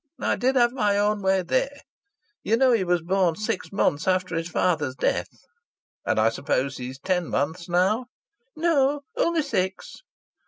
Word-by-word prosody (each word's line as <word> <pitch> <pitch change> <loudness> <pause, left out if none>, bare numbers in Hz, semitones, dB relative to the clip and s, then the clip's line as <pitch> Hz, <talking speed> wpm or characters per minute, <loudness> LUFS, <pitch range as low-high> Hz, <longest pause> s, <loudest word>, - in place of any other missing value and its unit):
I - - 0
did 260 +2 +1
have 240 -2 +4
my 210 -6 +1
own 210 0 +1
way 190 -1 +2
there! 265 +9 -1 0.6
You 225 - +1
know 260 +1 +4
he 225 -5 +2
was 175 -2 0
born 185 -1 +1
six 215 -2 -3
months 160 -6 0
after 185 -2 +1
his 165 +1 -2
father's 155 -6 0
death." - - 0 0.8
"And - - +2
I 110 +1 +4
suppose 135 +2 -2
he's 130 +1 -7
ten 180 +3 -1
months 160 +5 -2
now?" 195 +8 +1 0.5
"No. 290 -3 +2
Only 335 -2 +1
six." 190 -9 -3
190 Hz, 160 wpm, -25 LUFS, 165-240 Hz, 0.8 s, have